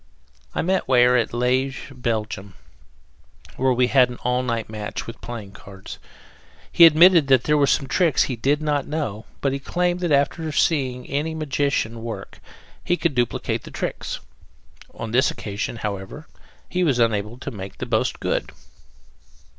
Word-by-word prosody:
I -, -, 0 dB
met 190 Hz, +3 st, 0 dB
Weyer 125 Hz, -1 st, +5 dB
at 120 Hz, -3 st, +1 dB
Liege, 130 Hz, +3 st, -1 dB
Belgium, 110 Hz, -6 st, -3 dB, 1.0 s
where 130 Hz, 0 st, +2 dB
we 125 Hz, 0 st, +3 dB
had 125 Hz, 0 st, +4 dB
an 125 Hz, -, -7 dB
all 125 Hz, +1 st, +1 dB
night 115 Hz, -3 st, -2 dB
match 105 Hz, -1 st, -5 dB
with 115 Hz, -, -9 dB
playing 110 Hz, -5 st, -7 dB
cards. 95 Hz, -1 st, -11 dB, 0.7 s
He 170 Hz, -, +9 dB
admitted 165 Hz, -1 st, +6 dB
that 130 Hz, -3 st, +4 dB
there 150 Hz, -, +2 dB
were 145 Hz, -2 st, +3 dB
some 140 Hz, -, +2 dB
tricks 165 Hz, 0 st, +3 dB
he 130 Hz, -, -3 dB
did 140 Hz, +6 st, 0 dB
not 145 Hz, -2 st, 0 dB
know, 140 Hz, -9 st, -4 dB
but 135 Hz, -1 st, +1 dB
he 140 Hz, -, -2 dB
claimed 175 Hz, +4 st, -1 dB
that 175 Hz, -3 st, -1 dB
after 145 Hz, +3 st, +2 dB
once 155 Hz, -2 st, -4 dB
seeing 130 Hz, -6 st, +1 dB
any 150 Hz, +4 st, -2 dB
magician 140 Hz, -6 st, -1 dB
work 110 Hz, -4 st, -7 dB, 0.4 s
he 175 Hz, -, +1 dB
could 170 Hz, -4 st, 0 dB
duplicate 120 Hz, -2 st, -1 dB
the -, -, -11 dB
tricks. -, -, -4 dB, 0.8 s
On 115 Hz, -, -6 dB
this 130 Hz, +3 st, +3 dB
occasion, 110 Hz, -1 st, -4 dB
however, 105 Hz, +7 st, -6 dB, 0.4 s
he 180 Hz, 0 st, -1 dB
was 140 Hz, -7 st, +2 dB
unable 110 Hz, -1 st, 0 dB
to 135 Hz, +2 st, -6 dB
make 95 Hz, -4 st, -8 dB
the -, -, -4 dB
boast -, -, 0 dB
good. -, -, -1 dB
130 Hz, 165 wpm, -23 LUFS, 115-150 Hz, 1.0 s, He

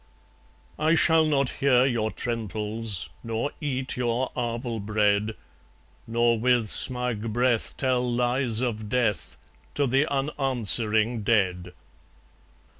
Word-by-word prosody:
I 155 Hz, +2 st, +3 dB
shall 160 Hz, -1 st, +4 dB
not 140 Hz, -3 st, +1 dB
hear 130 Hz, -2 st, +4 dB
your 115 Hz, -5 st, 0 dB
trentals, 110 Hz, -4 st, -3 dB
Nor 115 Hz, +5 st, -3 dB
eat 135 Hz, -4 st, -2 dB
your 125 Hz, +1 st, -1 dB
arval 120 Hz, -2 st, -3 dB
bread, 105 Hz, 0 st, 0 dB, 0.7 s
Nor 115 Hz, 0 st, +1 dB
with 120 Hz, -2 st, +1 dB
smug 125 Hz, -3 st, -1 dB
breath 120 Hz, 0 st, 0 dB
tell 125 Hz, -2 st, 0 dB
lies 120 Hz, -1 st, 0 dB
of 110 Hz, -4 st, -3 dB
death 120 Hz, -3 st, -1 dB, 0.4 s
To 145 Hz, -, +1 dB
the 135 Hz, +4 st, +1 dB
unanswering 120 Hz, -5 st, +2 dB
dead. 90 Hz, -5 st, 0 dB
120 Hz, 110 wpm, -25 LUFS, 110-130 Hz, 0.7 s, shall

